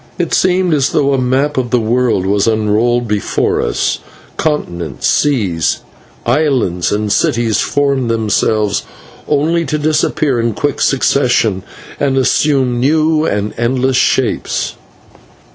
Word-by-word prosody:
It 175 -3 -2
seemed 185 -2 +2
as 140 -3 +1
though 140 -1 +2
a 135 - +1
map 135 +4 0
of 125 -2 -1
the 125 - +2
world 115 -3 0
was 100 +2 +1
unrolled 115 +2 +1
before 105 -2 0
us - - -1 0.4
continents, 85 - -3
seas, 100 - +1 0.4
islands, 125 - +1
and 105 0 -1
cities 115 -1 +1
formed 140 -4 0
themselves, 110 -2 0 0.5
only 160 +3 +1
to 150 +2 -1
disappear 150 -3 0
in 115 -2 -1
quick 145 +3 -2
succession, 125 -7 +1 0.4
and 135 -2 0
assume 130 -2 +1
new 155 +3 +2
and 105 +1 -2
endless 130 +2 0
shapes. - - 0
125 Hz, 125 wpm, -14 LUFS, 110-145 Hz, 0.5 s, seemed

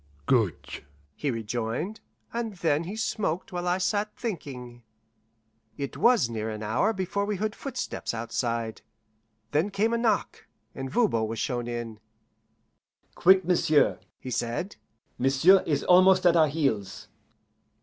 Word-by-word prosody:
"Good," 110 - 0 0.3
he 145 - -3
rejoined, 115 - -3 0.3
and 230 -3 -3
then 160 -2 0
he 195 +5 -5
smoked 200 -5 -2
while 175 0 -3
I 180 +1 +2
sat 205 +3 -1
thinking. 130 - -6 1.0
It 140 -1 -4
was 240 - +4
near 110 -1 -4
an 110 0 -5
hour 120 - +1
before 190 0 -2
we 205 0 -1
heard 210 +2 -2
footsteps 260 -1 -4
outside; 115 -1 -3 0.7
then 155 +7 +1
came 210 +3 0
a 235 - +1
knock, 230 -2 -1 0.3
and 135 0 -5
Voban 130 - +1
was 115 +1 -5
shown 120 +1 -2
in. 120 -2 -5 1.1
"Quick, 190 0 +5
m'sieu'," 160 -4 +3 0.2
he 130 - -7
said. 120 - -2 0.4
"M'sieu' 135 +9 +5
is 145 -3 0
almost 185 +1 +5
at 175 -1 +6
our 160 -2 +5
heels." 135 -11 -2
155 Hz, 135 wpm, -27 LUFS, 120-195 Hz, 1.1 s, at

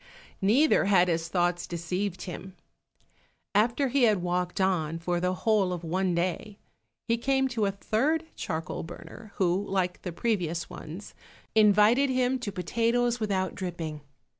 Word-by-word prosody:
Neither 240 +10 +4
had 185 -3 +4
his 165 -1 0
thoughts 175 0 0
deceived 180 +3 -3
him. 185 +1 -8 1.0
After 235 +6 +2
he 275 +2 +1
had 210 -5 +2
walked 180 +1 -1
on 170 -4 +1
for 175 +1 -1
the 180 +1 0
whole 205 -2 +2
of 175 -1 -4
one 180 +2 0
day, 185 +4 -2 0.5
he 230 -1 +1
came 265 +2 +2
to 230 -4 0
a - - 0
third 275 +11 0
charcoal 160 -2 -4
burner, 200 +6 -10
who 185 +1 +1
like 185 -2 -1
the 180 - -5
previous 175 -4 -1
ones, 170 +7 -9 0.4
invited 215 +5 +5
him 255 0 +1
to 215 -4 -4
potatoes 235 +6 0
without 195 -4 -1
dripping. 165 -5 -5
190 Hz, 145 wpm, -28 LUFS, 175-225 Hz, 1.0 s, invited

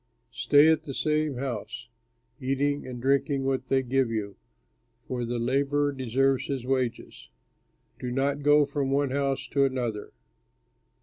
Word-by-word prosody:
Stay 145 +1 +5
at 160 -1 +4
the 140 -4 -7
same 155 -2 0
house, 120 -3 -5 0.5
eating 140 +2 -1
and 125 -1 -6
drinking 135 +2 +1
what 130 -1 -1
they 135 0 +2
give 130 0 +1
you, 105 -3 -3 0.7
for 125 -1 -3
the 120 +1 -3
laborer 140 +4 +1
deserves 135 0 0
his 135 -3 -3
wages. 130 -2 -3 0.7
Do 125 - -4
not 140 +3 0
go 145 0 +5
from 140 -1 -2
one 140 0 +1
house 135 0 -1
to 140 - +2
another. 120 -6 -2
135 Hz, 140 wpm, -27 LUFS, 125-140 Hz, 0.7 s, Stay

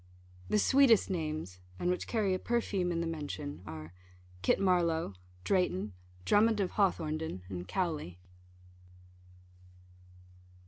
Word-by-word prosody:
The - - +3
sweetest 235 -2 +5
names, 155 - -3 0.2
and 180 - 0
which 180 - -2
carry 210 -5 +1
a 185 - -1
perfume 200 -7 0
in 165 -1 -1
the - - -1
mention, 150 - -5
are, 80 +1 -8 0.5
Kit 90 - +3
Marlowe, 170 - +2 0.3
Drayton, 105 - +1 0.3
Drummond 215 - +4
of 190 -3 0
Hawthornden, 160 - 0
and 90 -2 -5
Cowley. 155 - -2
170 Hz, 110 wpm, -32 LUFS, 145-195 Hz, 0.5 s, sweetest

